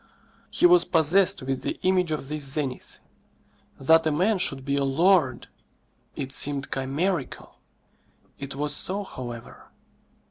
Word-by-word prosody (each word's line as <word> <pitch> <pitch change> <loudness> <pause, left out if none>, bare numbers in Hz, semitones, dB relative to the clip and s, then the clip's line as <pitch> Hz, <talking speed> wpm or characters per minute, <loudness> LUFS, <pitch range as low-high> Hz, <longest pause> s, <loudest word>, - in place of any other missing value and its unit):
He - - +1
was 355 0 +6
possessed 185 +3 +2
with 135 0 -3
the - - -4
image 185 -2 +2
of 155 -3 -3
this 150 0 -4
zenith. 135 -2 -2 0.8
That 160 +4 +4
a - - +1
man 185 +7 +1
should 135 -6 0
be 140 0 -1
a 140 - 0
lord! 140 -2 +2 0.7
it 135 0 -5
seemed 140 -1 0
chimerical. 140 +4 -3 0.8
It 140 -1 -7
was 145 +1 -1
so, 200 +6 -1
however. 120 - -10
150 Hz, 135 wpm, -25 LUFS, 135-185 Hz, 0.8 s, was